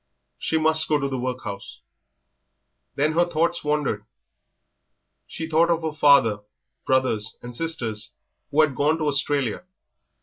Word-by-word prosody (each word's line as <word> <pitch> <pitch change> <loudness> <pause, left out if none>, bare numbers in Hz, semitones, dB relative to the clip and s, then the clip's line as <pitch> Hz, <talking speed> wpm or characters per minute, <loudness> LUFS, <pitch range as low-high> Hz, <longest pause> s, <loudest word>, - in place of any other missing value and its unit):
She 160 - 0
must 160 0 +3
go 150 - +2
to 140 -1 -2
the 135 -2 -3
workhouse. 115 - -6 1.2
Then 150 +3 +1
her 170 +2 +4
thoughts 170 0 -1
wandered. 150 -8 -1 1.2
She 160 - -6
thought 165 +1 +3
of 170 -1 +1
her 160 -1 -2
father, 140 -8 +4 0.5
brothers, 130 -5 +1
and 120 0 -8
sisters, 120 -9 -1 0.4
who 150 +2 +3
had 155 -3 +2
gone 150 +4 +2
to 160 - -3
Australia. 140 -3 -1
145 Hz, 135 wpm, -24 LUFS, 125-160 Hz, 1.2 s, her